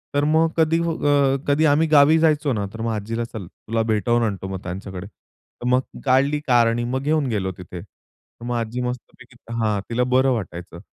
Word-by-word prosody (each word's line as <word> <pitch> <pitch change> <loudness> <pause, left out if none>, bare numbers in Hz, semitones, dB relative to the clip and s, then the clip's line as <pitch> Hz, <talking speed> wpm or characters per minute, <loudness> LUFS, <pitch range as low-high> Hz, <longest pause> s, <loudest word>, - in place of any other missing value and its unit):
तर 145 - +2
मग 160 +2 +3
कधी 165 0 +3
फ 170 - -1 0.2
अ, 140 -2 +3
कधी 145 +2 +3
आम्ही 155 +2 +3
गावी 150 +1 +6
जायचो 155 -3 +2
ना, 105 -3 -2
तर 115 - -7
मग 115 0 -1
आजीला 110 +2 -3
चल 100 -6 -7
तुला 115 +5 -4
भेटावून 120 +3 +1
आणतो 100 -4 -3
मग 95 -1 -5
त्यांच्याकडे. 95 +1 -7
तर 110 - -17
मग 125 +1 +3 0.2
काढली 140 +3 +3
कार 120 -3 +4
आणि 115 +1 0
मग 130 +2 -2
घेऊन 150 -1 +1
गेलो 100 -4 -1
तिथे. 90 -1 -9 0.6
मग 120 0 -3
आजी 115 +1 -3
मस्तपैकी 125 0 -7 0.2
हां, 105 -2 +1
तिला 120 +1 +1
बरं 130 +1 +2
वाटायचं. 90 -6 -5
120 Hz, 190 wpm, -22 LUFS, 110-145 Hz, 0.6 s, गावी